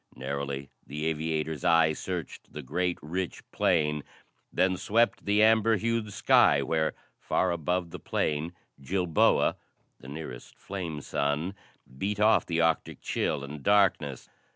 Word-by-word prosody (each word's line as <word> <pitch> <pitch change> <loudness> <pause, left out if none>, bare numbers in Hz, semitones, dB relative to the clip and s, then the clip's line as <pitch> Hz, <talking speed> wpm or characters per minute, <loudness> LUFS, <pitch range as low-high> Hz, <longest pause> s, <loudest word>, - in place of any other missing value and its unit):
Narrowly, 70 +1 -4 0.2
the 75 +3 -4
aviator's 80 -1 -2
eye 80 -2 +4
searched 90 +1 -6
the 75 - -6
great, 90 +6 -1
rich 90 +4 -4
plain, 75 -4 +1 0.5
then 95 0 +2
swept 110 +5 +1
the 105 +1 +3
amber 110 0 +5
hued 115 0 -1
sky - - +4
where, 80 -1 0 0.2
far - - 0
above 85 +1 -1
the - - -7
plain, 80 +3 -1 0.3
Jilboa, 90 +2 +2 0.4
the - - -13
nearest 70 -4 -8
flame 85 -6 -5
sun, 75 +7 -1 0.5
beat 105 +1 -2
off 110 +1 +4
the 85 -1 +1
Arctic 80 -1 0
chill 70 -2 -1
and 70 +1 -7
darkness. 95 -8 +2
80 Hz, 130 wpm, -28 LUFS, 75-95 Hz, 0.5 s, amber